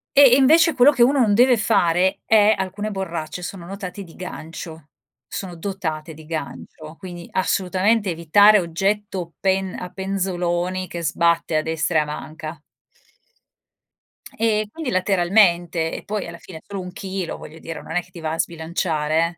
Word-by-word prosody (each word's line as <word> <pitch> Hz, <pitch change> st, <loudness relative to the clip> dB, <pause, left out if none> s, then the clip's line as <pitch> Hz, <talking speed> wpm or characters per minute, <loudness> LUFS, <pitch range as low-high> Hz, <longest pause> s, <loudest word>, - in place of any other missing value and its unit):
E 280 Hz, -, +8 dB
e -, -, +9 dB
invece 320 Hz, +5 st, +5 dB
quello 260 Hz, +4 st, +6 dB
che 250 Hz, -4 st, +3 dB
uno 275 Hz, +3 st, +3 dB
non 220 Hz, -5 st, +4 dB
deve 245 Hz, +3 st, +5 dB
fare 185 Hz, -4 st, +2 dB
è: 215 Hz, -1 st, +5 dB
alcune 200 Hz, +3 st, -3 dB
borracce 175 Hz, -3 st, -4 dB
sono 175 Hz, -1 st, -7 dB
notati 195 Hz, +1 st, -7 dB
di 165 Hz, -, -15 dB
gancio, 160 Hz, -3 st, -8 dB, 0.4 s
sono 180 Hz, -3 st, -6 dB
dotate 165 Hz, -4 st, -4 dB
di 155 Hz, +1 st, -13 dB
gancio, 155 Hz, 0 st, -7 dB
quindi 175 Hz, -2 st, -9 dB
assolutamente 190 Hz, +3 st, +1 dB
evitare 200 Hz, +6 st, +5 dB
oggetto 185 Hz, 0 st, -2 dB
pen 190 Hz, -1 st, 0 dB
a 180 Hz, -, -6 dB
penzoloni 185 Hz, -1 st, -2 dB
che 170 Hz, 0 st, -6 dB
sbatte 170 Hz, +1 st, +1 dB
a 155 Hz, -, +2 dB
destra 160 Hz, 0 st, 0 dB
e -, -, +3 dB
a 150 Hz, -, -2 dB
manca 155 Hz, +1 st, -7 dB, 1.8 s
e 215 Hz, -2 st, +1 dB
quindi 310 Hz, 0 st, -4 dB
lateralmente. 175 Hz, -3 st, +2 dB
E -, -, -6 dB
poi 210 Hz, -1 st, -4 dB
alla 170 Hz, 0 st, -8 dB
fine 165 Hz, -2 st, -11 dB
è -, -, -25 dB
solo 200 Hz, -2 st, -6 dB
1 180 Hz, 0 st, -7 dB
chilo, 190 Hz, -3 st, -5 dB
voglio 160 Hz, -, -11 dB
dire, 165 Hz, 0 st, -7 dB
non 160 Hz, -, -7 dB
è 180 Hz, -, +1 dB
che 180 Hz, -, -22 dB
ti 175 Hz, -, -10 dB
va 160 Hz, -1 st, -3 dB
a 165 Hz, -, -5 dB
sbilanciare 165 Hz, 0 st, -1 dB
180 Hz, 165 wpm, -22 LUFS, 165-200 Hz, 1.8 s, e